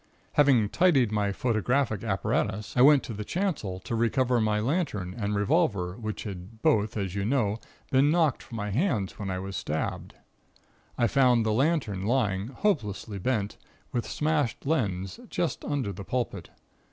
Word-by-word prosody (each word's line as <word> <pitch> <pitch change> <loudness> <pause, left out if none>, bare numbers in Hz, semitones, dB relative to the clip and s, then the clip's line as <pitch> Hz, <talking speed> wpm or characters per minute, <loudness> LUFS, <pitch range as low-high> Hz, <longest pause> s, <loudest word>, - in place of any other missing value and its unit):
"Having 130 -8 +4
tidied 140 - +3
my 105 -2 +1
photographic 115 +1 0
apparatus, 105 0 -1
I 125 - +4
went 145 +1 +7
to 115 - -6
the 105 0 -5
chancel 145 - -2
to - - -5
recover 120 +1 +2
my 105 -1 +1
lantern 110 - -1
and 105 -2 -2
revolver, 100 - +1
which 110 -1 -5
had 100 +2 -9
both 110 +1 +2
as 95 -3 -2
you 100 0 -2
know 110 -2 +1 0.3
been 135 +2 +4
knocked 160 -4 +2
from 115 - -9
my 105 -1 -3
hands 115 - 0
when 100 -2 -3
I 95 - -2
was 95 +1 -5
stabbed. 80 -2 -3 0.8
I 120 - +3
found 125 -1 +4
the 110 - +1
lantern 120 - 0
lying, 105 -5 +1
hopelessly 110 - -2
bent, 105 -1 -1 0.3
with 120 -2 -2
smashed 150 -7 0
lens, 95 - -1
just - - -2
under 135 -9 -2
the 100 - -8
pulpit. 125 +3 -3
110 Hz, 160 wpm, -27 LUFS, 100-135 Hz, 0.8 s, went